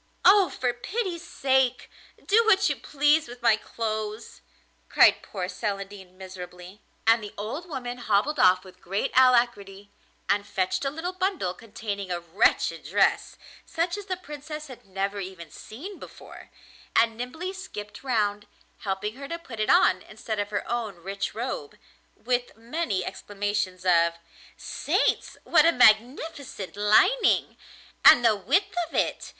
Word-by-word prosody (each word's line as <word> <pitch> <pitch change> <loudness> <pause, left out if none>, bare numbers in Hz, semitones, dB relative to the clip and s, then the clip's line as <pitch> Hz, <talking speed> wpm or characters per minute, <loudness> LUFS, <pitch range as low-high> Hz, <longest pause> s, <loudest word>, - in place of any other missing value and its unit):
'Oh! 390 -1 +7
for 250 -1 -1
pity's 360 - -4
sake, 265 -5 +1 0.4
do 445 +3 +4
what 400 -2 +4
you - - 0
please 295 +1 +2
with 245 0 -12
my 225 - +5
clothes,' 215 -1 -5 0.5
cried - - +5
poor 185 -3 -5
Celandine 195 -2 -5
miserably. 185 +1 -10 0.2
And 225 0 +4
the 205 - -9
old 275 - -5
woman 245 -4 -5
hobbled 240 +6 +1
off 185 -2 +5
with 185 -1 -16
great 195 +4 -2
alacrity, 235 -6 +2 0.4
and 200 0 +1
fetched 185 +5 -1
a - - +2
little 325 +6 -5
bundle 370 - -1
containing 205 -1 -6
a 175 -1 -2
wretched 175 +5 +1
dress, - - +1 0.3
such 335 +2 -2
as 410 -1 -8
the 370 -2 -2
Princess 300 -2 -8
had 255 -7 -13
never 195 +1 -3
even 185 -4 -8
seen 350 - -10
before, - - -12 0.5
and 225 0 +4
nimbly 320 +11 -5
skipped 210 - -9
round, 210 -5 0 0.3
helping 210 +3 -3
her 280 0 -7
to 335 - -4
put 260 -10 -11
it 215 - 0
on 185 - +5
instead 215 0 -6
of 205 0 -2
her 205 -1 -3
own 230 -4 -3
rich 195 +3 -5
robe, 230 - -5 0.4
with 245 -2 -2
many 230 - -2
exclamations 205 -2 -3
of: 170 -2 +4 0.4
'Saints! - - -1
what - - +5
a - - +6
magnificent 245 - +2
lining! 215 - +3 0.5
And 245 - +8
the 220 -2 +5
width 330 - +1 0.2
of - - -11
it! - - -1
220 Hz, 145 wpm, -26 LUFS, 200-280 Hz, 0.5 s, And